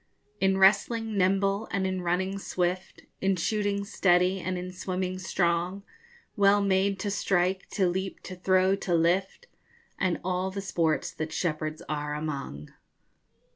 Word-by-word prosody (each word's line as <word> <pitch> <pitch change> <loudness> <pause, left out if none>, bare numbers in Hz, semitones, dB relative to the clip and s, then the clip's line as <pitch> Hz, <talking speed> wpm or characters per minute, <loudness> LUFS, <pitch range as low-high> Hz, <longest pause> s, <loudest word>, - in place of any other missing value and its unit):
In 190 0 +2
wrestling 215 +3 +3
nimble, 195 +2 +2
and 195 -1 -1
in 185 -1 -1
running 185 +3 -1
swift, 180 -1 -2 0.2
In 195 0 +2
shooting 200 +2 -1
steady, 185 -1 +2
and 185 0 -3
in 180 +1 -5
swimming 185 0 -3
strong, 180 +1 0 0.5
Well 200 -1 +5
made 195 0 +2
to 205 - -2
strike, 190 -1 0
to 190 -3 +2
leap, 190 +2 -3
to 185 - -7
throw, 185 +1 +3
to 175 -3 -1
lift, 180 - +1 0.6
_And 185 -2 +1
all 185 +1 -1
the 195 +1 -5
sports 165 -5 0
that 155 0 -5
shepherds 155 -2 -2
are 150 -1 -3
among. 140 - -5
185 Hz, 140 wpm, -28 LUFS, 175-195 Hz, 0.6 s, Well